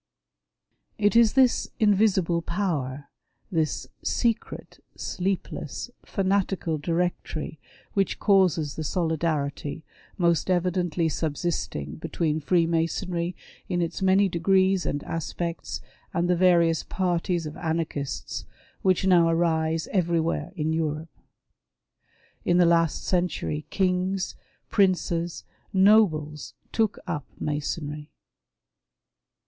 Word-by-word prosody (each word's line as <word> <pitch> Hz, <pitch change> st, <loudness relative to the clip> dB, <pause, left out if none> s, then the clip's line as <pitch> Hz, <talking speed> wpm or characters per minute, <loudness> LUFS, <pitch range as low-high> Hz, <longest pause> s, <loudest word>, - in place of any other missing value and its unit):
It 205 Hz, +1 st, +2 dB
is 230 Hz, -2 st, +6 dB
this 260 Hz, -3 st, +3 dB
invisible 195 Hz, -5 st, +3 dB
power; 150 Hz, -7 st, -2 dB, 0.4 s
this 160 Hz, -4 st, 0 dB, 0.2 s
secret, 230 Hz, -2 st, -2 dB
sleepless, 185 Hz, -, -3 dB
fanatical 190 Hz, -4 st, 0 dB
Directory, 165 Hz, -1 st, -2 dB, 0.3 s
which 195 Hz, -1 st, +1 dB
causes 180 Hz, -7 st, +3 dB
the 160 Hz, -, -4 dB
solidarity, 155 Hz, -2 st, -1 dB, 0.3 s
most 170 Hz, -1 st, +2 dB
evidently 175 Hz, -2 st, +1 dB
subsisting 145 Hz, -, -2 dB
between 155 Hz, -, -1 dB
Freemasonry 170 Hz, +2 st, 0 dB, 0.3 s
in 175 Hz, -2 st, 0 dB
its 170 Hz, +1 st, -2 dB
many 190 Hz, +1 st, +4 dB
degrees 190 Hz, +1 st, +2 dB
and 145 Hz, -, -2 dB
aspects 165 Hz, +1 st, -4 dB, 0.3 s
and 170 Hz, +1 st, +1 dB
the 180 Hz, -, +3 dB
various 170 Hz, -2 st, +4 dB
parties 175 Hz, -2 st, -1 dB
of 150 Hz, 0 st, -6 dB
anarchists 160 Hz, -4 st, -3 dB, 0.4 s
which 190 Hz, 0 st, +2 dB
now 175 Hz, -3 st, +5 dB
arise 165 Hz, -1 st, +1 dB
everywhere 170 Hz, -2 st, 0 dB
in 160 Hz, -2 st, -1 dB
Europe. 160 Hz, 0 st, -2 dB, 1.3 s
In 175 Hz, -, +3 dB
the 180 Hz, -, +6 dB
last 165 Hz, -2 st, +2 dB
century 175 Hz, -4 st, -1 dB
kings, 185 Hz, 0 st, 0 dB, 0.3 s
princes, 175 Hz, -4 st, +1 dB, 0.3 s
nobles, 190 Hz, -7 st, +3 dB, 0.2 s
took 220 Hz, -2 st, +1 dB
up 155 Hz, -6 st, -4 dB
Masonry. 150 Hz, 0 st, -3 dB
170 Hz, 95 wpm, -26 LUFS, 160-185 Hz, 1.3 s, is